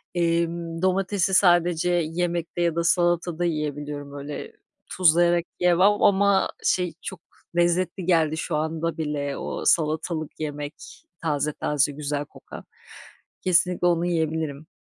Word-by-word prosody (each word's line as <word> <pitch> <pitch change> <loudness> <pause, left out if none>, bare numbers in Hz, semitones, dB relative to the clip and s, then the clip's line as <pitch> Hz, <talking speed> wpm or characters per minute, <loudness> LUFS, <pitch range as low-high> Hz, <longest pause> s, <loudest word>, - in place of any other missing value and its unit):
emm, 170 0 -1
domatesi 190 0 +1
sadece 175 -2 +4 0.2
yemekte 175 0 -2
ya 170 -2 +1
da 170 - 0
salatada 175 0 +1
yiyebiliyorum. 145 -3 -4
Öyle 145 +1 -7 0.4
tuzlayarak 175 -1 +4
yiyemem 180 0 +3
ama, 200 -1 +3
şey, 180 -2 +1
çok 190 - -7 0.4
lezzetli 175 +1 +1
geldi 160 -3 +2
şu 155 - -3
anda 160 +2 -2
bile 145 -3 -3
o - - -5
salatalık 155 0 0
yemek, 145 -1 -5 0.5
taze 150 -2 -1
taze, 145 0 +1
güzel 145 0 -3
kokan. - - -12 0.8
Kesinlikle 180 0 +2
onu 170 0 +2
yiyebilirim. 160 -3 -2
165 Hz, 115 wpm, -24 LUFS, 150-175 Hz, 0.8 s, sadece